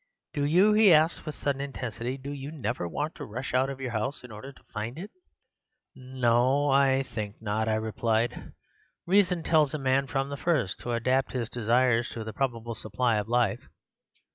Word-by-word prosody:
Do 145 Hz, -1 st, 0 dB
you,' 185 Hz, +8 st, +5 dB
he 210 Hz, -2 st, +6 dB
asked 160 Hz, +1 st, +3 dB
with 155 Hz, -, -4 dB
a -, -, -15 dB
sudden 140 Hz, -1 st, -1 dB
intensity, 125 Hz, -2 st, -4 dB
'do 140 Hz, +1 st, -7 dB
you 140 Hz, 0 st, -6 dB
never 125 Hz, -, -3 dB
want 150 Hz, -, -3 dB
to -, -, -8 dB
rush 125 Hz, +5 st, -6 dB
out 130 Hz, +1 st, +2 dB
of 135 Hz, -1 st, -6 dB
your 130 Hz, -2 st, -4 dB
house 115 Hz, +6 st, -3 dB
in 125 Hz, -, -11 dB
order 110 Hz, +6 st, -9 dB
to -, -, -21 dB
find 115 Hz, +4 st, -4 dB
it?' 195 Hz, +6 st, -7 dB, 0.8 s
"'No, 130 Hz, +2 st, +1 dB
I 135 Hz, 0 st, +4 dB
think 105 Hz, -5 st, -6 dB
not,' 110 Hz, +1 st, -1 dB
I 110 Hz, -, +2 dB
replied; 110 Hz, +1 st, -1 dB, 0.5 s
'reason 180 Hz, -2 st, +3 dB
tells 155 Hz, -3 st, +3 dB
a -, -, -1 dB
man 135 Hz, 0 st, +1 dB
from 135 Hz, 0 st, -1 dB
the 140 Hz, -, -5 dB
first 135 Hz, -, 0 dB
to 120 Hz, -, -3 dB
adapt 130 Hz, +3 st, +1 dB
his 120 Hz, -4 st, -2 dB
desires 120 Hz, +1 st, +2 dB
to 115 Hz, -, -5 dB
the 110 Hz, 0 st, -7 dB
probable 115 Hz, -2 st, -2 dB
supply 110 Hz, +2 st, 0 dB
of 105 Hz, +1 st, -3 dB
life. 120 Hz, 0 st, 0 dB
130 Hz, 190 wpm, -28 LUFS, 115-140 Hz, 0.8 s, he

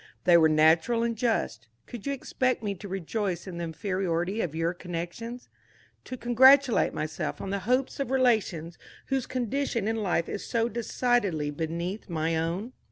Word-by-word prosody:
They 175 Hz, -2 st, +6 dB
were 160 Hz, -2 st, +6 dB
natural 160 Hz, +9 st, +4 dB
and 235 Hz, 0 st, 0 dB
just. 220 Hz, -, -1 dB, 0.2 s
Could 235 Hz, -2 st, -8 dB
you -, -, +1 dB
expect 255 Hz, -2 st, -1 dB
me 205 Hz, -1 st, -1 dB
to 200 Hz, +2 st, -9 dB
rejoice 190 Hz, 0 st, -3 dB
in 180 Hz, -3 st, -7 dB
the 170 Hz, -, -2 dB
inferiority 185 Hz, +2 st, -1 dB
of 160 Hz, -3 st, -3 dB
your 165 Hz, +1 st, 0 dB
connections? 180 Hz, +8 st, -6 dB, 0.6 s
To 255 Hz, -, -6 dB
congratulate 260 Hz, +2 st, +5 dB
myself 155 Hz, 0 st, -4 dB
on 195 Hz, -, -5 dB
the 200 Hz, -, -1 dB
hope 255 Hz, +1 st, +3 dB
of 275 Hz, -, -2 dB
relations 220 Hz, -11 st, +1 dB, 0.3 s
whose 270 Hz, -2 st, 0 dB
condition 250 Hz, -2 st, -1 dB
in 225 Hz, 0 st, 0 dB
life 185 Hz, -6 st, 0 dB
is -, -, -5 dB
so 230 Hz, -1 st, 0 dB
decidedly 225 Hz, -9 st, 0 dB
beneath 170 Hz, +7 st, -4 dB
my 165 Hz, 0 st, 0 dB
own?" 175 Hz, +9 st, -2 dB
200 Hz, 165 wpm, -28 LUFS, 170-240 Hz, 0.6 s, They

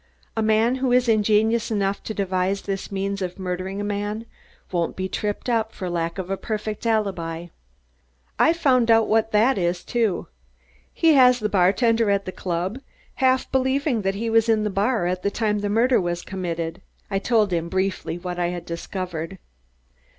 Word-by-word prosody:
"A 225 Hz, -, 0 dB
man 220 Hz, +3 st, +3 dB
who 260 Hz, -2 st, +1 dB
is 250 Hz, 0 st, +3 dB
ingenious 220 Hz, +1 st, +2 dB
enough 200 Hz, -2 st, 0 dB
to 220 Hz, -, -3 dB
devise 190 Hz, 0 st, -1 dB
this 195 Hz, 0 st, -4 dB
means 195 Hz, 0 st, -2 dB
of 180 Hz, -1 st, -4 dB
murdering 185 Hz, +1 st, -4 dB
a -, -, -2 dB
man 205 Hz, +2 st, -3 dB, 0.5 s
won't 170 Hz, -2 st, -1 dB
be 190 Hz, 0 st, -2 dB
tripped 205 Hz, +4 st, -3 dB
up 225 Hz, -2 st, +1 dB
for 185 Hz, -2 st, -5 dB
lack 170 Hz, 0 st, -2 dB
of 190 Hz, 0 st, -4 dB
a 195 Hz, -, 0 dB
perfect 215 Hz, +1 st, -4 dB
alibi." 175 Hz, -6 st, -1 dB, 0.9 s
"I've 330 Hz, +1 st, +4 dB
found 255 Hz, -7 st, +3 dB
what 225 Hz, 0 st, +3 dB
that 215 Hz, +2 st, +3 dB
is 175 Hz, 0 st, -1 dB
too. 230 Hz, -6 st, 0 dB, 0.7 s
He 325 Hz, -2 st, +4 dB
has 250 Hz, -3 st, +6 dB
the 215 Hz, -3 st, -2 dB
bartender 210 Hz, +4 st, +3 dB
at 200 Hz, 0 st, +1 dB
the 185 Hz, -, -4 dB
club 185 Hz, +6 st, -3 dB, 0.4 s
half 260 Hz, 0 st, +2 dB
believing 265 Hz, -1 st, +1 dB
that 195 Hz, 0 st, -1 dB
he 225 Hz, +3 st, -3 dB
was 225 Hz, 0 st, +3 dB
in 220 Hz, -1 st, +3 dB
the 210 Hz, -, -1 dB
bar 200 Hz, 0 st, +1 dB
at 180 Hz, +1 st, -1 dB
the 200 Hz, -, +1 dB
time 210 Hz, 0 st, 0 dB
the 205 Hz, 0 st, -2 dB
murder 235 Hz, +3 st, +3 dB
was 175 Hz, -1 st, -2 dB
committed." 170 Hz, -4 st, -4 dB, 0.3 s
I 195 Hz, -, +1 dB
told 215 Hz, -3 st, +2 dB
him 170 Hz, 0 st, -1 dB
briefly 190 Hz, -2 st, -1 dB
what 180 Hz, 0 st, -5 dB
I 175 Hz, -, +1 dB
had 175 Hz, -1 st, -5 dB
discovered. 170 Hz, 0 st, -5 dB
205 Hz, 180 wpm, -23 LUFS, 185-225 Hz, 0.9 s, has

